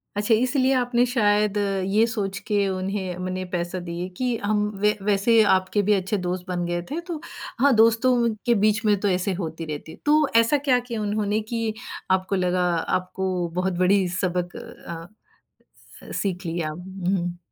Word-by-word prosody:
अच्छा 210 +3 +2
इसलिए 255 +3 +2
आपने 245 -1 +2
शायद 210 -4 +2 0.3
ये 210 +3 +3
सोच 200 -5 -3
के 205 -2 +2
उन्हें 190 -1 -3
उन्हें 185 0 -4
पैसा 175 +1 -3
दिए 170 +1 -4
कि 250 -2 0
हम 210 0 +1 0.2
व 210 0 +5
वैसे 210 +3 +4
आपके 185 +2 0
भी - - +6
अच्छे 195 +1 0
दोस्त 180 -1 -3
बन 175 -1 -2
गए 175 0 -2
थे 310 - -2
तो 335 -4 -4 0.4
हाँ, 280 +2 +5
दोस्तों 230 +1 +4
के 240 -1 +4
बीच 215 +2 +2
में 210 -1 +5
तो 205 - 0
ऐसे 185 +1 0
होती 165 -2 -5
रहती 155 0 -6
है। - - -12
तो 300 0 +4
ऐसा 230 +5 +5
क्या 270 -3 +2
किया 235 -3 -5
उन्होंने 210 0 0
कि 230 -2 -1 0.4
आपको 190 +1 +1
लगा 180 -1 +1
आपको 185 +1 -1
बहुत 185 +1 0
बड़ी 185 +1 +3
सबक 180 -1 -2
अ, 170 +5 -11 0.8
सीख 190 -2 -2
लिया? 165 -2 -2
हुँ। 180 +1 -3
195 Hz, 170 wpm, -24 LUFS, 180-225 Hz, 0.8 s, भी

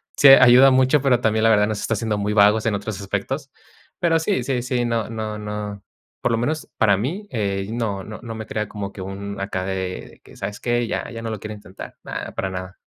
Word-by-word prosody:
sí 145 - +6
ayuda 130 0 +8
mucho, 130 +2 +4
pero 125 -3 +3
también 110 -1 +1
la 115 - +5
verdad 105 -1 +4
nos 105 -1 -3
está 115 - 0
haciendo 110 0 -1
muy 105 +1 -1
vagos 105 +1 +4
en 110 - +1
otros 100 0 -4
aspectos, 100 - -3 0.5
pero 165 -1 +3
sí, 190 +5 0
sí, 130 -3 -1
sí, 125 -1 -1
no 115 -2 -1
no 110 -1 -4
no 105 -1 -5 0.4
por - - +1
lo 115 - +2
menos 150 +6 -2
para 100 -3 +4
mí, 170 - -3
eh, 100 -4 -2
no 110 -5 -2
no 110 - -8
no 115 -2 -7
me 110 - -6
crea 105 -1 -2
como 100 -2 -6
que 100 - -9
un 100 +1 -6
acá 95 -1 -3
de 95 0 -2 0.3
de - - -19
que: - - -16
"¿Sabes 105 - -5
qué?, 120 -1 0
ya - - -3
ya 115 - -7
no 115 - -4
lo 110 - -4
quiero 110 +2 -6
intentar", 105 -2 -11
na, - - -6
para 95 - -2
nada. 95 0 -7
110 Hz, 235 wpm, -22 LUFS, 100-120 Hz, 0.5 s, ayuda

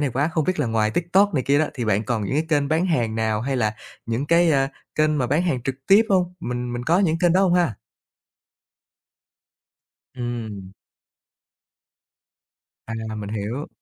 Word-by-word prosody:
này 145 -3 0
quá. 145 +7 0
Không 160 -3 0
biết 185 -4 0
là 135 - 0
ngoài 110 -1 +1
TikTok 180 - +2
này 130 - +1
kia 140 +3 +2
đó, 155 - +2
thì 120 -3 -3
bạn 105 -1 +1
còn 110 -2 -1
những 100 - -2
cái 155 +2 0
kênh 145 -3 +1
bán 165 +4 +1
hàng 120 -10 0
nào 110 -1 0
hay 130 +3 -2
là 110 -3 0 0.3
những 115 +5 -2
cái, 170 +1 +4
a, 135 -1 +2 0.3
kênh 155 -1 +2
mà 125 - +1
bán 145 +8 +1
hàng 135 -9 -1
trực 135 +1 -2
tiếp 200 +3 +7
hông? 180 -2 +1
Mình 125 -2 -4
mình 120 0 -4
có 170 +5 +3
những 165 -4 +2
kênh 175 -1 +3
đó 185 - +4
hông 185 -2 +3
ha? 170 - +2 2.4
Ừm. 110 -6 -6 2.1
À, 110 - -5 0.2
mình 105 -1 -6
hiểu. 110 +7 -4
135 Hz, 185 wpm, -23 LUFS, 115-165 Hz, 2.4 s, tiếp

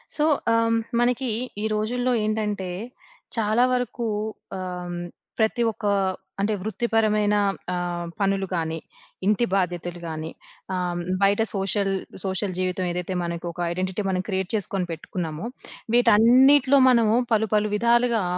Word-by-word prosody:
So, 300 - +2 0.3
ఆహ్, 230 - +4
హ్మ్. 230 0 +2 0.2
మనకి 250 +1 +1 0.3
ఈ - - 0
రోజుల్లో 245 +4 0
ఏంటంటే, 210 -3 -1 0.7
చాలా 220 +2 +3
వరకు 245 -1 -2 0.5
ఆహ్, 180 -1 -5 0.5
ప్రతి 220 +2 +2
ఒక్క 215 - -9 0.6
అంటే 210 +2 +1
వృత్తిపరమైన 215 -1 +1 0.4
ఆహ్, 175 -1 -2
పనులు 195 -1 +1
కానీ, 160 -1 -2 0.5
ఇంటి 215 +3 +3
బాధ్యతలు 175 -2 -2
గాని, 160 0 -5 0.4
ఆహ్, 175 -1 -2 0.2
బయట 200 +2 +4
సోషల్ 195 0 0 0.3
సోషల్ 190 0 -1
జీవితం 185 0 -1
ఏదైతే 180 +1 -3
మనకు 170 0 -4
ఒక 170 - -14
ఐడెంటిటీ 185 +3 -2
మనం 185 -1 0
క్రియేట్ 190 -2 -1
చేసుకొని 195 -3 -2
పెట్టుకున్నామో, 165 +2 -5 0.5
వీటన్నిటిలో 260 +5 +6
మనము 230 -3 +4 0.2
పలు, 220 0 +2
పలు 210 0 +2
విధాలుగా 235 0 +3
205 Hz, 125 wpm, -24 LUFS, 180-230 Hz, 0.7 s, వీటన్నిటిలో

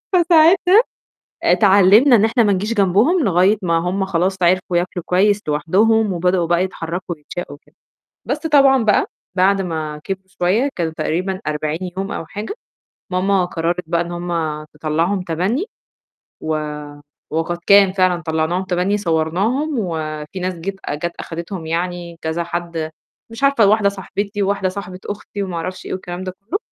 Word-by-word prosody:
فساعتها 350 +3 +5 0.7
اتعلّمنا 205 +5 +6
إن 210 - +3
إحنا 230 +2 +3
ما 205 -2 +3
نيجيش 210 +5 -1
جنبهم 210 - +3
لغاية 190 +2 +3
ما 170 -2 +2
هم 185 +3 -1
خلاص 190 +1 0
عرفوا 180 0 +2
ياكلوا 175 0 -1
كويس 205 +3 +2
لوحدهم 205 +8 +2
وبدؤوا 180 0 +1
بقى 175 +2 +2
يتحرّكوا 175 -1 -5
ويتشاقوا 150 0 -7
وكده، - - -29 0.5
بس 285 - -1
طبعًا 275 -5 +4
بقى 210 -2 +3 0.3
بعد 195 +1 +3
ما 155 -4 -4
كبروا 190 0 -5
شوية 210 +11 +2
كان 165 -3 -2
تقريبًا 185 +4 -2
40 155 +1 -2 0.2
يوم 195 +1 -3
أو - - -4
حاجة، 210 - -6 0.6
ماما 185 0 +2
قرّرت 175 +1 -2
بقى 170 0 +1
إن 175 - -4
هم 170 -3 -3
تطلّعهم 165 +5 -1
تَبَنّي، 185 - -1 0.8
و 155 0 -1 0.7
وقد 165 +2 -2
كان 200 -1 +6
فعلًا 185 -2 +1
طلّعناهم 160 +3 -1
تَبَنّي 185 +3 0
صوّرناهم 200 - 0
وفي 160 -2 -4
ناس 185 0 -2
جيت 190 +4 -5
جات 170 +4 -3
أخدتهم 170 0 -6
يعني 170 0 -3
كذا 160 +2 -2
حد، 170 -2 -4 0.4
مش 230 +3 -9
عارفة 275 -7 +4
واحدة 205 0 +4
صاحبتي 200 +1 -4
وواحدة 195 -1 0
صاحبة 185 -1 -7
أختي 205 0 -5
وما 185 -3 -4
أعرفش 185 +3 -5
إيه - - -5
والكلام 180 0 -5
ده 185 - -4
كلّه. 325 - -3
185 Hz, 155 wpm, -19 LUFS, 170-205 Hz, 0.8 s, اتعلّمنا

